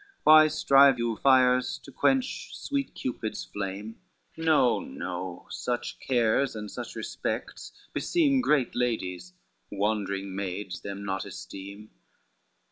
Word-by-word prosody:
Why 155 0 +8
strive 140 -3 +5
you 120 -1 -1
fires 130 -2 +4
to - - -12
quench, 270 - 0
sweet 280 -2 -3
Cupid's 115 -3 -4
flame? 105 +2 -6 0.3
No, 155 -7 +3
no, 90 0 -6
such 120 0 -3
cares, 125 +1 +1
and 105 -1 -6
such - - -7
respects - - -4 0.2
beseem 285 -6 +2
Great 150 - +1
ladies, 90 -7 -2 0.4
wandering 100 -2 -2
maids 95 -1 -4
them 100 0 -6
naught 95 -1 -2
esteem. 100 +2 -9
115 Hz, 115 wpm, -27 LUFS, 100-140 Hz, 0.4 s, Why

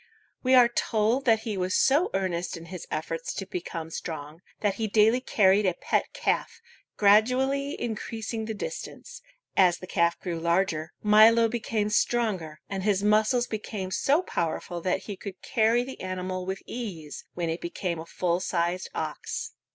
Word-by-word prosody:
We 260 0 +4
are 245 -2 +8
told 230 +2 0
that 225 -3 +4
he 220 -2 -3
was 185 -1 -1
so 295 +7 +4
earnest 180 -2 -2
in 165 - -10
his 180 - -7
efforts 165 +1 -3
to 195 - -4
become 165 -3 -5
strong, 160 0 -6 0.2
that 205 -2 +2
he 220 - +1
daily 220 +3 +4
carried 200 -4 +3
a 180 - +1
pet - - 0
calf, - - -1 0.4
gradually 255 +7 +3
increasing 225 0 -4
the 220 0 -4
distance. 485 - -7 0.3
As 180 -2 +5
the - - -9
calf 170 -2 +1
grew 170 -3 -4
larger, 170 -1 0
Milo 220 +2 +7
became 220 -2 -1
stronger, 195 -10 0
and 195 -1 -3
his 200 0 +1
muscles 215 +4 +3
became 210 -4 -5
so 290 - +2
powerful 170 - -3
that 180 +1 0
he 205 - -6
could 190 -1 -8
carry 230 +2 +2
the 265 +1 -9
animal 185 0 -4
with 190 0 -4
ease 170 - -6
when 170 -2 -1
it 165 - -4
became 170 0 -3
a 165 - -8
full 175 0 0
sized 175 0 -1
ox. - - -4
195 Hz, 165 wpm, -27 LUFS, 175-225 Hz, 0.4 s, are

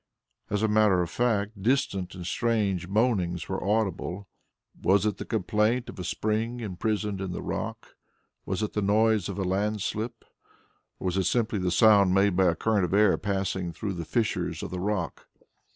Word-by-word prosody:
As 105 +1 0
a - - +4
matter 105 -4 +4
of 85 - -6
fact 105 -4 0
distant 105 -6 0
and 90 -1 -7
strange 100 -4 0
moanings 95 -5 0
were 95 - -3
audible. 100 -2 -1 0.5
Was 100 +2 +3
it 105 -3 0
the - - -6
complaint 115 +4 0
of - - -9
a - - -3
spring 110 +6 -1
imprisoned 105 -1 -2
in 95 -2 -3
the - - -5
rock? - - -5 0.5
Was 95 +3 -2
it 105 - -3
the 105 - 0
noise 105 0 +2
of 100 - -5
a 100 - -1
landslip? 105 +4 -2 0.7
Or - - -8
was 90 0 0
it 95 - +1
simply 115 0 +1
the 90 -1 0
sound 100 0 +5
made 100 -1 +3
by 95 +1 +4
a 85 -2 +3
current 105 +2 +1
of 90 +2 0
air 105 -2 +5
passing 95 -3 -2
through 100 +4 -4
the 85 -2 -4
fissures 110 +7 -1
of - - -5
the 90 - -4
rock? 95 -2 -3
100 Hz, 185 wpm, -27 LUFS, 95-110 Hz, 0.7 s, sound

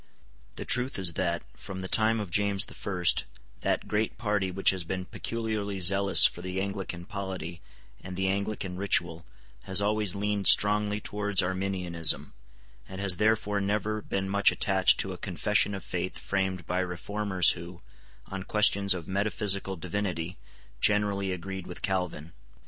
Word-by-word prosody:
The - - -6
truth 125 +2 +1
is 90 -3 -1
that, 85 -1 -2
from 95 -1 -8
the 95 - -4
time 110 +3 +3
of 100 -5 -6
James 100 +1 +2
the - - -12
First, 90 -4 0 0.3
that - - -1
great 105 +1 -1
party 105 -4 -1
which 95 +1 +3
has 95 -2 -3
been 95 +2 -4
peculiarly 110 -2 -4
zealous 95 +2 +6
for 85 - +1
the 90 +1 -4
Anglican 95 -3 -4
polity 95 -4 -6 0.4
and 95 0 -7
the 95 0 0
Anglican 100 -1 -3
ritual 85 -4 -1 0.4
has 95 0 +3
always 105 -2 +2
leaned 100 0 0
strongly 105 0 +4
towards 105 -1 +2
Arminianism, 90 -3 0 0.6
and 95 0 -8
has 95 -3 +1
therefore 105 -1 +1
never 105 +2 -1
been 95 -1 -3
much 100 +1 +3
attached 95 -2 +3
to 95 - -5
a 90 - -10
confession 105 +2 0
of 95 - -7
faith 90 0 -4
framed 95 -3 -2
by 90 +1 -2
reformers 95 +1 +1
who, 85 +1 -9 0.4
on 95 0 -6
questions 100 -1 +3
of 85 -3 -7
metaphysical 100 0 +1
divinity, 90 -1 -4 0.4
generally 100 -2 +1
agreed 95 +1 -6
with 90 - -8
Calvin. 90 -4 -3
95 Hz, 155 wpm, -28 LUFS, 90-105 Hz, 0.6 s, zealous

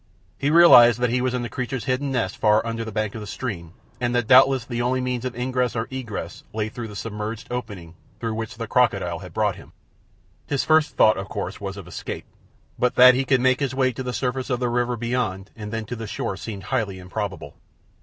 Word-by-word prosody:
He 140 - +1
realized 125 -8 +8
that 125 -1 +1
he 125 +1 +1
was 125 0 0
in 125 - -2
the - - -3
creature's 125 -3 -4
hidden 135 +2 -1
nest 115 -7 -1
far 105 +1 +3
under 115 0 -3
the 110 - -6
bank 105 -1 -2
of 115 - -6
the 105 - -7
stream, 100 -7 -5 0.3
and 120 0 -1
that 120 -2 +1
doubtless 130 +1 +6
the 120 -1 -3
only 125 +2 +1
means 125 -1 -2
of 125 -2 -4
ingress 125 0 -1
or 115 0 -2
egress 125 -5 -6
lay 110 0 -2
through 115 +1 -6
the 105 - -10
submerged 105 +1 -5
opening 100 -9 -6 0.3
through 115 -1 -2
which 110 0 -5
the - - -4
crocodile - - +1
had - - -10
brought - - 0
him. - - -15 0.7
His 140 -2 0
first 155 -1 +3
thought, 110 - +5
of 95 +1 -5
course, 100 -1 -5
was 100 0 -5
of 95 -3 -9
escape, 90 - -6 0.5
but 125 - +1
that 125 0 +9
he 130 +1 0
could 130 -1 +3
make 130 0 +3
his 135 -2 -2
way 130 -1 +2
to 130 - -6
the 125 -1 -3
surface 130 +1 -2
of 125 -2 0
the 125 -1 0
river 120 0 0
beyond 115 -5 -2
and 105 -2 -7
then 115 -1 -3
to 120 - -5
the 115 -1 -6
shore 95 - -3
seemed 100 0 -7
highly 105 -7 0
improbable. 95 +1 -5
120 Hz, 230 wpm, -23 LUFS, 105-125 Hz, 0.7 s, that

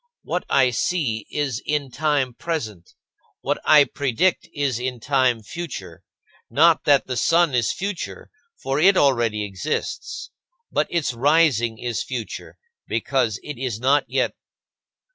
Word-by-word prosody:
What 180 - -3
I 130 -2 +4
see 120 -4 -1
is 135 -6 -2
in 145 -3 -2
time 145 -3 0
present, 115 - -5 0.5
what - - -1
I 150 -2 +7
predict 140 +6 0
is 140 -5 -1
in 125 -1 -3
time 130 -3 +1
future 170 +6 -7 0.5
not 165 +2 +4
that 145 -2 +4
the 130 - -4
sun 165 +5 +3
is 120 -3 +2
future, 195 -1 -5 0.3
for 135 +2 -1
it 190 +4 +5
already 115 -6 +2
exists; 100 +10 -4 0.4
but - - +1
its 165 -7 -1
rising 130 -4 +3
is 120 0 -3
future, 120 -4 -6 0.3
because 120 -7 0
it 150 -5 -7
is 120 -5 -2
not 140 +4 +3
yet. - - 0
135 Hz, 135 wpm, -22 LUFS, 120-155 Hz, 0.5 s, I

